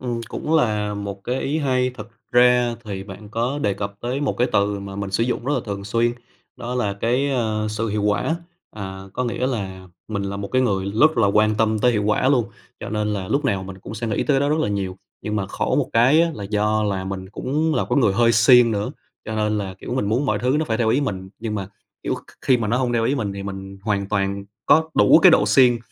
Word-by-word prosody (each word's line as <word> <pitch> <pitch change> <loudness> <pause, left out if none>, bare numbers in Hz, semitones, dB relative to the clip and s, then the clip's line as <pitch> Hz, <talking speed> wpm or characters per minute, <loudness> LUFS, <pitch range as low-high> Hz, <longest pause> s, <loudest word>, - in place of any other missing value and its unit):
Ừm, 120 -2 -3
cũng 155 - -2
là 105 -8 +1
một 100 -1 -6
cái 125 +2 -1
ý 150 +3 -1
hay. 130 -3 +1
Thực 115 -3 -10 0.2
ra 125 -1 +4
thì 100 -2 -5
bạn 105 +1 -10
có 120 +6 -2
đề 100 -7 0
cập 100 0 -5
tới 125 +4 -2
một 140 - -1
cái 125 - +2
từ 100 0 +1
mà 100 0 -7
mình 100 -1 -4
sử 105 +4 +1
dụng 125 -1 -2
rất 145 - 0
là - - 0
thường 100 -2 -5
xuyên, 115 +3 +1 0.4
đó 125 +1 -5
là 105 -5 0
cái, 125 +7 0
ờ, 110 -5 -1
"sự 115 +1 -2
hiệu 105 0 -1
quả". 105 +10 +1 0.3
À, 95 -2 -7
có 125 - -1
nghĩa 125 +2 -1
là 95 -7 -4 0.2
mình 100 -2 -2
là 100 0 -4
một 100 0 -5
cái 130 0 +2
người 95 -5 0
rất 150 +3 +4
là 110 - +4
quan 105 +2 +3
tâm 110 0 +1
tới 125 +3 +3
hiệu 105 -2 0
quả 105 +5 +2
luôn, 130 -5 +3 0.4
cho - - -6
nên 105 0 -1
là 95 -2 -4
lúc 140 +1 0
nào 100 -7 0
mình 95 0 -9
cũng 105 - -9
sẽ 115 +2 -4
nghĩ 105 - -1
tới - - 0
cái 135 - +3
đó 140 - +1
rất 155 +1 +1
là - - 0
nhiều. 95 -2 -3 0.2
Nhưng 105 0 -2
mà 95 -2 -1
khổ - - -1
một - - +1
cái 130 +8 +5
á 170 - +1
là 100 - -6
do 105 +1 +1
là 100 -2 -1
mình 95 0 -5
cũng 150 +9 -1
là 100 - +1
cái 125 - +2
người 110 -7 +3
hơi 115 +2 +3
siêng 120 +1 +6
nữa, 105 -1 -1 0.3
cho 110 - -5
nên 105 0 0
là, 95 -2 -4
kiểu, 125 - -5
mình 115 -6 0
muốn 125 +6 +1
mọi 105 -3 +1
thứ 125 +6 +1
nó 160 - 0
phải 110 -6 -1
theo 115 -2 +2
ý 125 +6 +3
mình, 95 -9 -3
nhưng 110 -1 -4
mà, 95 -2 -4 0.3
kiểu, - - -1
kh - - -11
khi 130 - +4
mà 110 -3 -2
nó 115 - +1
hông 125 -1 0
theo 115 -1 +1
ý 130 - +1
mình 105 -7 -2
thì 100 - -6
mình 95 0 -7
hoàn 100 -2 -1
toàn 100 -1 -1 0.2
có 160 +1 +4
đủ 100 - +6
cái - - +7
độ - - +4
siêng 125 -3 +5
110 Hz, 265 wpm, -22 LUFS, 100-125 Hz, 0.4 s, cái